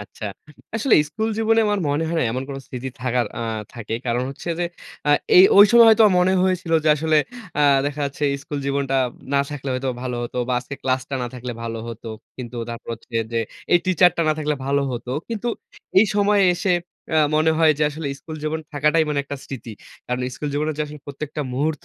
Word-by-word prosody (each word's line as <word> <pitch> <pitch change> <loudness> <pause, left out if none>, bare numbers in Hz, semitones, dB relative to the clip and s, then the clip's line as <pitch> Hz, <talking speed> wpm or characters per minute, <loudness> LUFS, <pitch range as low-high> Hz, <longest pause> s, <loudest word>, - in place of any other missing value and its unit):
আচ্ছা। 105 +1 -10 0.5
আসলে 225 +2 +3 0.2
স্কুল 220 +5 -2
জীবনে 225 0 +3
আমার 205 -1 +1
মনে 145 +3 0
হয় 170 - -1
না, - - +2
এমন 130 +2 -2
কোন 140 - -5
স্থিতি 130 +1 -5
থাকার 125 -1 0
আ - - -3 0.3
থাকে। 115 -1 -5
কারণ 120 +1 0
হচ্ছে 140 - -8
যে, 175 - +1 0.4
আ - - +5 0.3
এ - - +10 0.2
ঐ - - +8
সময় 235 -1 +8
হয়তো 225 0 +6
আমার 185 - +2
মনে 185 +1 +3
হয়েছিল 185 -3 -1
যে, - - +3
আসলে 155 +1 +2 0.4
আ - - +3 0.3
দেখা 145 +1 -4
যাচ্ছে, 140 +1 -3 0.2
"স্কুল 145 - -5
জীবনটা 140 -1 0 0.4
না 140 - +5
থাকলে 140 -2 -5
হয়তো, 130 +1 -2
ভালো 125 -1 -3
হতো। 120 - -6
বা - - 0
আজকে 125 +3 -8
ক্লাসটা 130 +1 -1
না - - -2
থাকলে 125 0 -5
ভালো 115 -1 -4
হতো।" 115 0 -8 0.3
কিন্তু 125 -1 -7
তারপর 115 0 -8
হচ্ছে 115 - -21 0.2
যে, 115 - +1 0.3
"এই 175 - +7
টিচারটা 180 -2 +4
না - - +4
থাকলে 150 -1 0
ভালো 140 0 +2
হতো।" 120 +1 -5 0.2
কিন্তু 230 +1 -3 0.5
এই 210 - +6
সময়ে 205 -1 +4
এসে 185 +1 0 0.4
আ - - +5 0.2
মনে 155 +1 +3
হয় 160 -1 +6
যে, - - +1
আসলে 155 0 -6
স্কুল 160 0 -8
জীবন 155 +1 -1
থাকাটাই 150 +3 +3
মানে 150 -1 0
একটা 140 +1 -5
স্মৃতি। 125 -4 -7 0.3
কারণ 125 0 -2 0.2
স্কুল 150 - -4
জীবনে 150 +2 0
যে 150 - 0
আসলে 150 0 -10
প্রত্যেকটা 145 +1 -5
মুহূর্ত 150 +2 -1
145 Hz, 210 wpm, -22 LUFS, 130-170 Hz, 0.5 s, এ